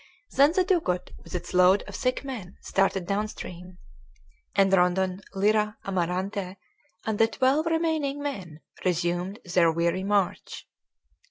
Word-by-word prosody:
Then 285 Hz, +3 st, +5 dB
the 370 Hz, -, +3 dB
dugout 325 Hz, -, 0 dB
with -, -, -8 dB
its 180 Hz, -, -5 dB
load 185 Hz, +2 st, +5 dB
of -, -, -9 dB
sick 255 Hz, +1 st, -1 dB
men 225 Hz, -10 st, -7 dB
started 195 Hz, -1 st, +1 dB
down 205 Hz, +3 st, 0 dB
stream, 180 Hz, -3 st, -9 dB, 0.8 s
and 195 Hz, -1 st, +4 dB
Rondon, 185 Hz, +1 st, +2 dB
Lyra, 210 Hz, +2 st, +2 dB
Amarante, 185 Hz, +1 st, -2 dB, 0.5 s
and 220 Hz, -2 st, -1 dB
the 225 Hz, -, +6 dB
twelve 265 Hz, +8 st, +1 dB
remaining 320 Hz, -4 st, 0 dB
men 190 Hz, -, -5 dB, 0.2 s
resumed 175 Hz, +2 st, 0 dB
their 175 Hz, -2 st, +3 dB
weary 170 Hz, +3 st, 0 dB
march. 200 Hz, -2 st, -1 dB
195 Hz, 135 wpm, -26 LUFS, 180-240 Hz, 0.8 s, the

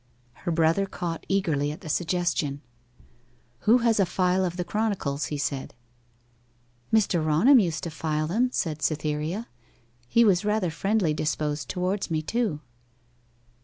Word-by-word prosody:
Her 170 Hz, -, -4 dB
brother 165 Hz, +4 st, +2 dB
caught 170 Hz, -4 st, -5 dB
eagerly 155 Hz, -7 st, +1 dB
at 150 Hz, -, -9 dB
the -, -, -9 dB
suggestion. 160 Hz, -4 st, -1 dB, 1.0 s
'Who 225 Hz, -, +5 dB
has 225 Hz, -2 st, +3 dB
a 195 Hz, -, +5 dB
file 185 Hz, +1 st, +1 dB
of 175 Hz, -1 st, -2 dB
the 180 Hz, -, -1 dB
Chronicles?' 190 Hz, -9 st, -1 dB
he 150 Hz, -, -3 dB
said. 140 Hz, -4 st, -3 dB, 1.2 s
'Mr. 195 Hz, -7 st, +2 dB
Raunham 170 Hz, -, +5 dB
used 170 Hz, -7 st, -1 dB
to 170 Hz, -, -4 dB
file 155 Hz, -1 st, -1 dB
them,' 225 Hz, +10 st, +1 dB
said 155 Hz, -9 st, -2 dB
Cytherea. 155 Hz, +7 st, -2 dB, 0.6 s
'He 230 Hz, -, +4 dB
was 190 Hz, -3 st, +3 dB
rather 210 Hz, -4 st, 0 dB
friendly 195 Hz, 0 st, +1 dB
disposed 150 Hz, -2 st, -2 dB
towards 185 Hz, +2 st, -1 dB
me, 155 Hz, -1 st, -1 dB
too. 215 Hz, -6 st, -1 dB
170 Hz, 140 wpm, -26 LUFS, 155-195 Hz, 1.2 s, Who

